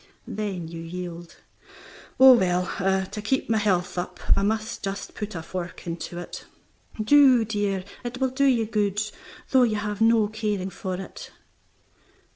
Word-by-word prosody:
Then 195 -5 -4
you 165 0 -7
yield. 170 0 -7 0.8
"Oh, 265 0 +10
well, 180 -5 +2 0.4
to 210 +3 -7
keep 230 +2 -1
my 220 - +3
health 180 -3 0
up 175 - -5 0.2
I - - 0
may 215 +3 +2 0.2
just 195 0 -5
put 210 -2 -6
a 165 - -5
fork 180 +1 -6
into 170 0 -5
it." 175 - -7 0.5
"Do, 255 0 +6
dear; 205 -3 -1 0.2
it 245 +1 -5
will 260 -1 +1
do 280 +2 +1
you 245 -5 +3
good, 210 -2 0 0.5
though 260 - +6
you 230 -3 +3
have 210 0 -3
no 225 -1 +5
caring 210 -3 -2
for 185 -1 -4
it." 190 - -9
205 Hz, 155 wpm, -25 LUFS, 180-225 Hz, 0.8 s, Oh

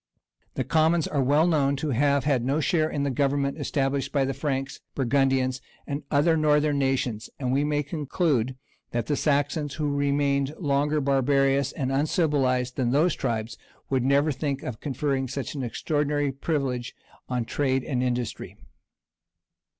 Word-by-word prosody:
The - - 0
commons 160 0 +2
are 145 - 0
well 145 +5 +3
known 145 -5 +2
to 145 +2 -2
have 140 +2 +2
had 135 -5 +1
no 135 +5 +1
share 155 +1 +1
in 145 -2 -2
the 140 - 0
governments 140 +2 0
established 135 -1 -1
by 140 -2 +2
the 135 - -2
Franks, 135 -1 -3 0.2
Burgundians, 130 -1 +1 0.2
and 140 +1 -3
other 155 +3 +3
northern 150 -1 +2
nations; 130 -5 -1
and 130 -2 -1
we 140 +2 +2
may 150 0 0
conclude 145 -4 -1 0.4
that 120 -1 -1
the 145 - 0
Saxons, 145 0 0
who 150 -2 -1
remained 140 0 +1
longer 145 0 +1
barbarous 135 0 +2
and 135 -3 -3
uncivilized 135 -4 +1
than 125 -3 +1
those 155 +6 +3
tribes, 115 -3 -3 0.3
would 130 -1 +2
never 140 +3 +3
think 140 0 -3
of 120 -3 -5
conferring 135 -1 -1
such 135 +1 -4
an 140 - -4
extraordinary 145 +3 -1
privilege 135 -3 -2 0.3
on 125 -2 -1
trade 130 0 0
and 125 -3 -1
industry. 125 -2 -3
140 Hz, 155 wpm, -26 LUFS, 130-145 Hz, 0.4 s, well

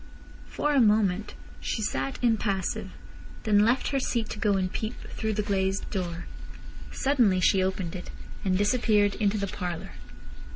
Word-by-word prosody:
For 295 0 -1
a 275 - +5
moment 210 -2 +2 0.2
she 220 - -2
sat 135 -7 -2
impassive, 205 -5 0 0.5
then 210 -2 +4
left 235 +5 +3
her 275 - +1
seat 235 -4 -1
to 210 - -6
go 210 -1 +2
and 185 -1 -1
peep 220 +2 -3 0.2
through 220 -1 -2
the 210 0 -1
glazed 195 -1 0
door. 175 -4 -3 0.7
Suddenly 245 -9 +2
she 190 +1 +4
opened 185 -2 -2
it, 180 - -7 0.3
and 185 -2 +2
disappeared 205 -1 +3
into 210 -1 +1
the 200 - -1
parlour. 180 -3 -5
205 Hz, 155 wpm, -27 LUFS, 190-220 Hz, 0.7 s, a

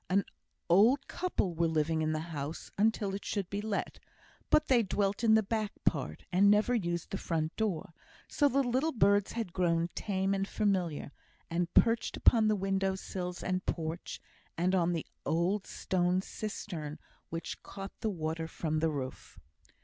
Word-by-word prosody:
An 195 +1 +3 0.4
old 220 +10 +5
couple 345 - -1
were 170 0 +1
living 160 0 +1
in 155 0 +1
the 155 +2 -3
house 145 +2 -5
until 210 -1 +1
it 195 - -4
should 200 -4 -2
be 200 +1 -2
let, 210 -2 -3 0.5
but 305 - +4
they 255 -5 +4
dwelt 200 0 0
in 220 -1 +6
the 220 - +4
back 215 0 -1
part, 75 - 0
and 195 +3 +5
never 210 +4 +4
used 175 -7 -1
the 195 - -2
front 160 -1 -2
door; 195 -5 -2 0.3
so 290 - +3
the 275 +2 +2
little 260 +6 +1
birds 200 -3 +3
had 225 -7 -3
grown 170 -2 +1
tame 195 -1 0
and 195 0 -1
familiar, 185 -10 0 0.4
and 170 0 0
perched 230 0 +3
upon 225 -2 +5
the 215 - +3
window 195 0 0
sills 180 -2 -5
and 185 0 -1
porch, 165 +1 -3 0.4
and 180 +3 +2
on 175 -2 +3
the 165 - -2 0.2
old 185 +5 0
stone 180 0 0
cistern 175 -7 -5 0.3
which 165 0 -5
caught 195 0 -8
the 220 - -1
water 160 -3 -3
from 155 -1 -2
the 160 +1 +2
roof. 135 -4 -6
190 Hz, 170 wpm, -31 LUFS, 165-210 Hz, 0.5 s, in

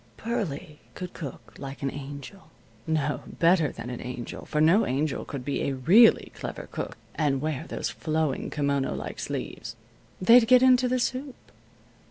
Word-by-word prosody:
Pearlie 165 -10 -4 0.2
could 180 -1 -6
cook 140 -7 -8
like 140 0 -7
an 135 - 0
angel; 145 +5 -9 0.4
no, 150 -2 0
better 165 -3 +3
than 120 - -7
an 125 - -6
angel, 125 -1 -6
for 150 - -2
no 165 +8 +5
angel 140 +3 -1
could 135 -3 -6
be 140 - -1
a 140 - 0
really 185 - +5
clever - - -6
cook - - -5 0.2
and 145 -4 +1
wear 150 -2 -3
those - - -3
flowing 155 -3 -1
kimono 140 -2 0
like - - -6
sleeves. - - -5 0.4
They'd 230 +5 +7
get 255 +1 +7
into 255 -1 +5
the 255 +1 +1
soup. 255 +2 -2
155 Hz, 160 wpm, -27 LUFS, 140-200 Hz, 0.4 s, They'd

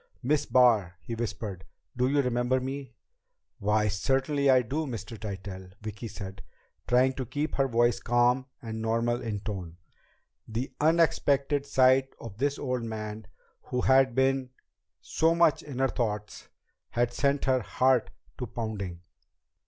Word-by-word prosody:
"Miss 150 +3 +1
Barr!" 110 -9 +4
he 115 - -7
whispered. 105 -4 -4 0.3
"Do 125 +1 +2
you 140 +1 +2
remember 125 +1 +1
me?" 135 +1 -6 0.6
"Why, 105 +1 +2
certainly 135 +7 +1
I 130 -1 +6
do, 150 +7 -2
Mr. 115 -2 -6
Tytell." 95 -3 -7
Vicki 110 +1 -6
said, 100 -2 -8 0.5
trying 130 +2 +4
to 130 -1 -4
keep 145 +5 -2
her 135 -1 +3
voice 120 -1 +2
calm 120 +2 +2 0.2
and 110 -1 -5
normal 115 +2 0
in 105 -3 -3
tone. 90 -6 -6 0.7
The 115 +4 -4
unexpected 145 -3 +2
sight 130 0 +4
of 115 -2 -9
this 145 +1 0
old 125 -3 -2
man 110 -2 -6 0.4
who 125 - -2
had 130 -2 +4
been 130 0 +2 0.5
so 165 +1 +2
much 170 -3 +4
in 140 -4 -8
her 135 0 +3
thoughts 105 -4 -3 0.4
had 120 0 0
sent 140 +1 +1
her 130 -2 +2
heart 130 +2 +2 0.3
to 125 - -3
pounding. 105 -6 -5
120 Hz, 145 wpm, -28 LUFS, 110-135 Hz, 0.7 s, I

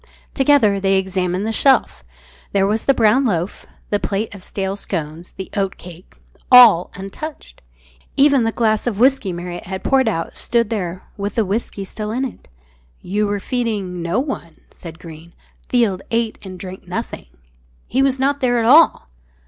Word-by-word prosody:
Together 270 -8 +3
they 195 0 +2
examined 185 0 -1
the 225 - -2
shelf. 270 +3 +3 0.5
There 195 -1 +3
was 215 +2 -1
the 275 - +4
brown 230 +4 +4
loaf, 180 -6 -2 0.2
the 205 - +2
plate 205 +2 -3
of 195 -2 -11
stale 195 0 -3
scones, 165 -3 -6
the 190 - -8
oatcake, 185 -3 -5 0.4
all 235 -9 +8
untouched. 195 - -8 0.6
Even 280 -3 +5
the 225 - 0
glass 220 0 0
of 220 -5 -1
whisky 260 -3 +3
Marriott 175 0 -7
had 190 0 -5
poured 265 -3 +2
out 165 -5 -4
stood 235 -2 0
there 185 -4 -3
with 200 0 -4
the 225 - +1
whisky 200 0 -3
still 210 +2 -6
in 250 +5 -1
it. 255 - -9 0.6
"You 205 +3 -1
were 205 0 -2
feeding 205 -7 -3
no 170 +7 0
one," 255 - -5
said 165 -2 -11
Greene 165 0 -12 0.4
"Field 225 -7 +1
ate 230 -1 -1
and 185 -2 -9
drank 185 +1 -9
nothing. 180 - -5 0.6
He 265 - 0
was 270 -1 +2
not 280 +2 0
there 245 -2 +1
at 230 - +1
all!" 300 - +5
205 Hz, 165 wpm, -19 LUFS, 185-240 Hz, 0.6 s, all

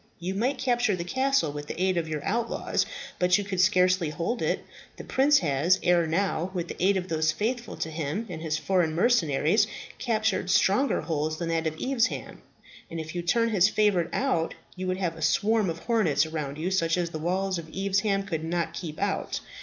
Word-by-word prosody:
"You 180 +3 -4
might 245 +8 0
capture 245 -5 +1
the 170 - -4
castle 260 - +1
with 145 0 -7
the - - -6
aid 185 0 +2
of 170 -2 -1
your 150 -2 -4
outlaws; 230 +3 -1 0.3
but 180 +1 +4
you 205 - -2
could 190 -2 -1
scarcely 185 -2 +3
hold 170 +11 -2
it. - - -1 0.3
The - - -8
prince 285 +3 +4
has, 160 +4 +2
ere 175 -2 +3
now, 180 +1 0
with 175 -1 -3
the - - -5
aid 195 +1 +4
of 185 -1 -3
those 155 -2 +1
faithful 230 +7 -3
to 160 - -3
him 160 +7 -3
and 165 -4 -7
his 155 -1 -1
foreign 175 -3 +1
mercenaries, 180 - +3 0.3
captured 220 -6 0
stronger 195 +8 +3
holds 155 -1 -2
than 170 0 -3
that 165 -1 0
of 155 0 -4
Evesham; 255 -2 -1 0.5
and 165 - -5
if 155 0 -6
you 175 - -2
turn 230 +7 +2
his 195 -2 +4
favourite 200 -6 +2
out, 250 -12 0 0.2
you 185 0 -4
would 185 0 0
have 175 -4 -2
a 160 - -10
swarm 215 +4 +2
of 165 - -3
hornets 175 - +2
around 150 -3 -4
you 170 +4 -2
such 165 -2 +1
as 170 -2 -1
the 155 - -5
walls 185 +3 -1
of 160 -1 -9
Evesham 195 +2 0
could 165 -5 -4
not 170 +1 -2
keep 155 -4 -6
out. 200 0 -1
180 Hz, 205 wpm, -27 LUFS, 160-205 Hz, 0.5 s, but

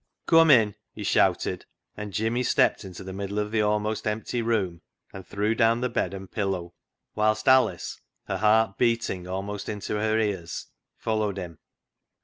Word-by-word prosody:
"Cum 165 -1 +6
in," 115 -7 +6 0.2
he - - -6
shouted, - - +1 0.3
and 105 -1 -6
Jimmy 115 +5 0
stepped 125 - +2
into 95 -2 -9
the 95 0 -7
middle 100 +1 -4
of 105 0 -1
the 110 -1 +2
almost 105 +1 0
empty 110 +3 -2
room 100 -7 -1 0.3
and 95 - -8
threw 105 +2 0
down 115 +1 +3
the 125 - 0
bed 90 - 0
and 95 -1 -8
pillow, 95 -5 -2 0.4
whilst 110 0 +1
Alice, 130 0 +3 0.2
her - - -2
heart 110 -1 +3
beating 115 -7 0
almost 100 +2 -4
into 105 0 -3
her 110 +1 +1
ears, 100 -6 -2 0.3
followed 110 -3 -1
him. 85 -4 -7
105 Hz, 160 wpm, -26 LUFS, 95-110 Hz, 0.4 s, Cum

